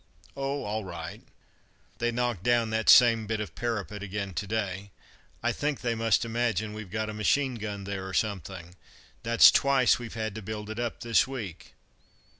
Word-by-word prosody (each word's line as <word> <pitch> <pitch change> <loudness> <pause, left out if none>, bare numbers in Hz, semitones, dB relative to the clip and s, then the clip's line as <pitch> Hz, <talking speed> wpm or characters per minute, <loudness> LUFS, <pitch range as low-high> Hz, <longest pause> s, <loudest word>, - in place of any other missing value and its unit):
"Oh, 140 +1 -2
all 105 +1 -3
right. 85 -3 -7 0.8
They 120 - +1
knocked 120 -5 -1
down 120 0 +2
that 110 0 +1
same 115 -3 +7
bit 110 0 -1
of 105 - -5
parapet 105 -3 -3
again 100 -1 -4
to 100 - -3
day. 100 -2 -3 0.5
I - - +2
think 145 -1 -2
they 120 -2 0
must 115 0 +2
imagine 115 -3 -1
we've 110 -3 -8
got 110 +2 -2
a - - -8
machine 130 +6 +1
gun 105 -3 -5
there, 95 -1 -5
or 95 - -7
something. 95 -4 -3 0.5
That's 115 +1 +7
twice 135 -3 +3
we've 120 -1 -8
had 110 -2 -3
to 110 - -7
build 105 +1 -6
it 110 - -6
up 120 -1 -3
this 115 +1 +3
week. 115 -11 -7
110 Hz, 180 wpm, -28 LUFS, 100-120 Hz, 0.8 s, same